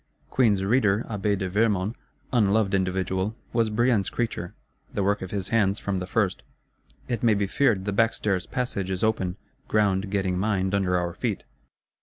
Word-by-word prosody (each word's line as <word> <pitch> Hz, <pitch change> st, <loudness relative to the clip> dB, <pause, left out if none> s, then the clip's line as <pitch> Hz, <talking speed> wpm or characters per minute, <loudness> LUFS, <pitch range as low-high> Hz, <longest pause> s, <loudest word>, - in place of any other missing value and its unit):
Queen's 105 Hz, -7 st, +3 dB
Reader 105 Hz, -1 st, +2 dB
Abbé 105 Hz, -1 st, 0 dB
de 95 Hz, -1 st, -2 dB
Vermond, 105 Hz, 0 st, +1 dB, 0.4 s
unloved 105 Hz, -3 st, +3 dB
individual, 95 Hz, +2 st, 0 dB, 0.2 s
was 115 Hz, -2 st, +2 dB
Brienne's 110 Hz, -3 st, +2 dB
creature, 115 Hz, -7 st, -3 dB, 0.4 s
the 100 Hz, -, -1 dB
work 100 Hz, +2 st, +1 dB
of 95 Hz, -, -5 dB
his 100 Hz, -1 st, -3 dB
hands 105 Hz, -3 st, +2 dB
from 100 Hz, -2 st, -2 dB
the 90 Hz, -, -5 dB
first: 100 Hz, -1 st, 0 dB, 0.7 s
it 120 Hz, -4 st, -2 dB
may 115 Hz, -3 st, +4 dB
be 100 Hz, 0 st, +1 dB
feared 100 Hz, -2 st, +1 dB
the 105 Hz, -, -1 dB
backstairs 105 Hz, -3 st, +1 dB
passage 110 Hz, -7 st, -2 dB
is 95 Hz, +1 st, -2 dB
open, 95 Hz, -5 st, 0 dB, 0.3 s
ground 100 Hz, -2 st, +1 dB
getting 95 Hz, -2 st, 0 dB
mined 95 Hz, -2 st, 0 dB
under 95 Hz, -2 st, +2 dB
our 90 Hz, -1 st, -2 dB
feet. -, -, -3 dB
100 Hz, 165 wpm, -26 LUFS, 95-110 Hz, 0.7 s, may